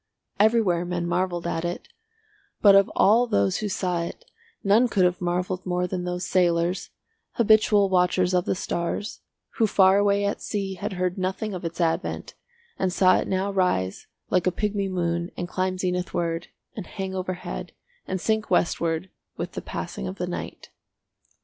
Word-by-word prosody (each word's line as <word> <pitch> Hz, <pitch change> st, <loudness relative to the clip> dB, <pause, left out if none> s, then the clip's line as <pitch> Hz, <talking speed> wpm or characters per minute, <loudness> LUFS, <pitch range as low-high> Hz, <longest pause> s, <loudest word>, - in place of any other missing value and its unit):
Everywhere 210 Hz, -5 st, +3 dB
men 175 Hz, -1 st, -2 dB
marvelled 175 Hz, 0 st, -1 dB
at 165 Hz, -1 st, -2 dB
it, 175 Hz, 0 st, -4 dB, 0.7 s
but 200 Hz, -2 st, +7 dB
of 195 Hz, 0 st, +5 dB
all 230 Hz, +5 st, +5 dB
those 100 Hz, -, +1 dB
who 210 Hz, -, -3 dB
saw 180 Hz, -3 st, -1 dB
it 170 Hz, -, -7 dB, 0.4 s
none 215 Hz, +5 st, +4 dB
could 195 Hz, -5 st, +2 dB
have 180 Hz, 0 st, 0 dB
marvelled 180 Hz, +1 st, -1 dB
more 180 Hz, 0 st, -1 dB
than 180 Hz, 0 st, -3 dB
those 180 Hz, 0 st, -3 dB
sailors, 175 Hz, 0 st, +1 dB, 0.4 s
habitual 215 Hz, -2 st, +4 dB
watchers 180 Hz, 0 st, +2 dB
of 180 Hz, -1 st, +2 dB
the -, -, 0 dB
stars, 180 Hz, +4 st, -3 dB, 0.4 s
who 225 Hz, -, +3 dB
far 195 Hz, -1 st, +5 dB
away 200 Hz, 0 st, +2 dB
at 200 Hz, -, -2 dB
sea 195 Hz, -2 st, -3 dB
had 190 Hz, -, -4 dB
heard 180 Hz, 0 st, -1 dB
nothing 190 Hz, +3 st, -2 dB
of 180 Hz, -, -6 dB
its 170 Hz, +1 st, -5 dB
advent 165 Hz, -2 st, -1 dB, 0.5 s
and 190 Hz, -1 st, +1 dB
saw 185 Hz, +1 st, +4 dB
it -, -, -3 dB
now 195 Hz, +1 st, 0 dB
rise 100 Hz, -, 0 dB, 0.2 s
like 185 Hz, 0 st, +2 dB
a -, -, +4 dB
pigmy 200 Hz, 0 st, -1 dB
moon 170 Hz, -1 st, -1 dB
and 175 Hz, -, -3 dB
climb 185 Hz, +1 st, -1 dB
zenithward 180 Hz, -2 st, -2 dB, 0.3 s
and 205 Hz, -6 st, -6 dB
hang 190 Hz, -1 st, -5 dB
overhead 185 Hz, -1 st, -5 dB, 0.4 s
and 190 Hz, -, -2 dB
sink 220 Hz, +3 st, 0 dB
westward 170 Hz, +1 st, 0 dB, 0.3 s
with -, -, -4 dB
the -, -, -5 dB
passing 65 Hz, -, -5 dB
of -, -, -5 dB
the -, -, -3 dB
night. -, -, -6 dB
185 Hz, 170 wpm, -25 LUFS, 175-195 Hz, 0.7 s, but